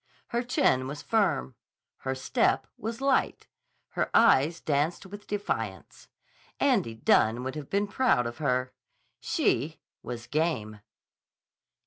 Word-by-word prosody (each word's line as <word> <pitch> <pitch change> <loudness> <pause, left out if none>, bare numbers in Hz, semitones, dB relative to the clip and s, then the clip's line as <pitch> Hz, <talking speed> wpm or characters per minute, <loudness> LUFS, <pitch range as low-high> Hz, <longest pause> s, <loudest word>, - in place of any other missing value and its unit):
Her 235 -1 0
chin 240 - +2
was 145 +1 -6
firm. 175 - +1 0.4
Her 130 0 -3
step 130 - +1
was 225 +3 -5
light. 275 -1 +1 0.4
Her - - -1
eyes 170 -7 +5
danced 155 +5 -1
with 205 +2 -10
defiance. 115 - -4 0.5
Andy 115 -1 +2
Dunne 110 +1 +3
would 130 0 -3
have 150 -1 -7
been 200 +1 +1
proud 205 - +2
of 120 0 -5
her. 130 -3 0 0.5
She - - 0 0.2
was 120 -1 -6
game. 120 -9 -1
145 Hz, 120 wpm, -28 LUFS, 125-205 Hz, 0.5 s, eyes